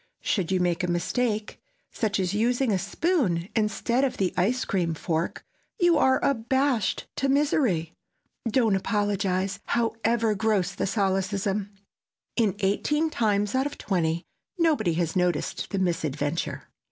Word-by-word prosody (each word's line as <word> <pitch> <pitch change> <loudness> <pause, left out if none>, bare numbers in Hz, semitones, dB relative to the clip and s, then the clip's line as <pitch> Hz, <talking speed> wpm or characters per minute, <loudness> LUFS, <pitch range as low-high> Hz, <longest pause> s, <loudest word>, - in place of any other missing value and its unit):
Should 190 -4 0
you 185 - +2
make 175 +1 0
a - - +1
mistake—such 220 - -2
as 185 0 0
using 240 +3 +1
a 190 - +1
spoon 200 - 0
instead 225 +4 +1
of 270 - 0
the 190 -2 0
ice 225 +7 +1
cream 170 -4 0
fork—you 180 - -1
are 265 -3 +4
abashed 260 -3 +1
to 270 - +1
misery. 265 - +1 0.6
Don't 225 -3 +3
apologize, 195 -1 0
however 230 -1 +1
gross 205 -3 +1
the 200 - -2
solecism! 195 0 0 0.7
In 215 -5 +2
eighteen 295 +11 +1
times 210 -4 +1
out 265 +2 +2
of 290 - -8
twenty, 170 -3 -1 0.3
nobody 315 - +2
has 165 -1 -1
noticed 180 -3 0
the 200 - -2
misadventure. 160 -4 -1
205 Hz, 130 wpm, -26 LUFS, 185-245 Hz, 0.7 s, are